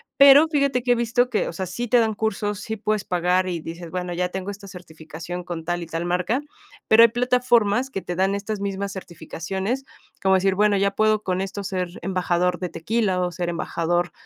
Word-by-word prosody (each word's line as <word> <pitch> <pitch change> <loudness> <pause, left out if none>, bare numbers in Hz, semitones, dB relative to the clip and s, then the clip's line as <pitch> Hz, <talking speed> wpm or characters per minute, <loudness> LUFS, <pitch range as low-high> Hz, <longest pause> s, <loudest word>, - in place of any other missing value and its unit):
Pero, 280 +3 +8
fíjate 280 -5 +1
que 245 - +2
he - - 0
visto 235 +1 +1
que, 220 - 0
o - - -7
sea, 190 +3 -3
sí 235 +7 -4
te 245 - +5
dan 220 -1 +1
cursos, 210 -1 -2
sí 220 +1 -5
puedes 215 -1 -1
pagar, 180 +1 +1
y 175 -2 -2
dices: 165 +1 -8
"Bueno, 180 0 -3
ya 180 +1 -1
tengo 190 +1 -5
esta 200 0 -11
certificación 170 -1 -8
con 170 -2 -6
tal 175 +1 -2
y - - -6
tal 165 +1 -3
marca", 180 +9 0 0.5
pero 220 +1 +7
hay 230 - +7
plataformas 245 -1 +2
que 195 -7 -4
te 175 - -5
dan 190 +2 +1
estas 200 +1 -4
mismas 200 0 -3
certificaciones, 190 +6 -4 0.4
como 190 0 +4
decir: 190 0 +2
"Bueno 205 0 +3
ya 200 0 +2
puedo 215 +1 +2
con 185 0 -1
esto 195 +1 -4
ser 185 -2 -2
embajador 180 -1 0
de 180 -1 -3
tequila, 195 +2 -1
o, 180 0 -1
ser 175 +1 -3
embajador 175 +1 -1
195 Hz, 210 wpm, -23 LUFS, 180-220 Hz, 0.5 s, Pero